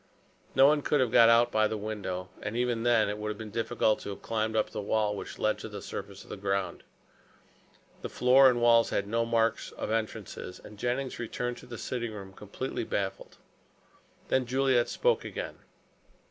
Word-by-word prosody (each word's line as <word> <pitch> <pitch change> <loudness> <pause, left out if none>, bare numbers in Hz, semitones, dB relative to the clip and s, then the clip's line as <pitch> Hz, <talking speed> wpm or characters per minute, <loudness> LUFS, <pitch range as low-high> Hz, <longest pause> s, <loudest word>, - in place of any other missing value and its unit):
No 135 - +7
one 150 +1 +4
could 145 +1 +1
have 125 -3 +2
got 115 -1 +7
out 120 +1 +5
by 110 0 +3
the 110 0 -3
window, 100 -4 -4
and 105 +3 -4
even 120 -2 0
then, 120 -2 +3
it 105 +1 -3
would 105 - -4
have 105 - -4
been 110 -1 -8
difficult 115 -1 +1
to - - -7
have 100 - -8
climbed 110 -1 -1
up 110 - +1
the - - -4
well 105 0 0
which - - -7
led 110 - 0
to 110 - -7
the 105 -1 -7
surface - - -7
of - - -14
the - - -5
ground. 100 -1 -2 1.2
The - - -5
floor 130 +2 +6
and 120 -1 +1
walls 115 -1 +5
had 100 - 0
no 115 +2 0
marks 115 -1 +1
of - - -4
entrances, 110 -4 -4
and 105 -1 -12
Jennings 125 +3 -2
returned 120 +1 -3
to - - -13
the 120 -1 -7
sitting 120 -2 -4
room 95 -2 -9
completely - - -5
baffled. - - -4 0.9
Then 130 -2 +1
Juliet 130 -1 +2
spoke 485 0 +1
again. - - -6
115 Hz, 195 wpm, -29 LUFS, 105-120 Hz, 1.2 s, No